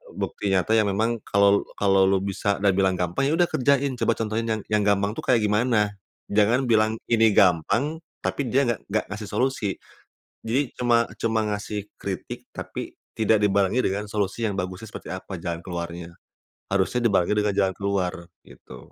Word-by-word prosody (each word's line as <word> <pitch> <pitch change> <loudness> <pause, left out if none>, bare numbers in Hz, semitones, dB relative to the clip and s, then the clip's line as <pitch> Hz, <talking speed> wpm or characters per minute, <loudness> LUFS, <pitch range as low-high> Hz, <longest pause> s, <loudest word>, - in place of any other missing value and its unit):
bukti 100 - -3
nyata 95 +4 +1
yang 110 -2 +4
memang 110 +4 0
kalau, 100 0 +3
kalau 95 -1 +3
lu 95 0 +2
bisa 100 +1 -1
dan 100 - +5
bilang 95 -1 +3
gampang, 90 +10 -1
ya 155 - +2
udah 175 - +4
kerjain, 135 -1 +1
coba 115 - +2
contohin 115 +1 -2
yang 110 -1 -1
yang 105 -1 +2
gampang 100 0 +2
tuh - - -7
kayak 120 -4 +4
gimana. 105 0 +2 0.4
Jangan 110 +6 +3
bilang, 110 -2 +2 0.2
"Ini 115 -1 +5
gampang", 110 - +3 0.2
tapi 140 -3 -1
dia 135 +5 +2
nggak 115 - -7
nggak 110 +2 0
ngasih 105 0 -5
solusi. 125 -4 -1 0.7
Jadi 125 +4 -1
cuma 120 -1 +2 0.2
cuma 110 -1 +1
ngasih 105 0 -4 0.2
kritik 95 -3 -6
tapi - - -7 0.2
tidak 110 -1 +2
dibarengi 100 +3 +2
dengan 100 +2 -2
solusi 105 +1 -2
yang 100 - -4
bagusnya 95 +3 -5
seperti - - -7
apa, 95 0 -6
jalan 85 0 -4
keluarnya. 85 -1 -6 0.5
Harusnya 100 +5 0
dibarengi 100 0 +2
dengan 105 -1 +1
jalan 95 -2 +1
keluar, 95 -3 -2 0.2
gitu. - - -14
105 Hz, 170 wpm, -24 LUFS, 95-115 Hz, 0.7 s, dan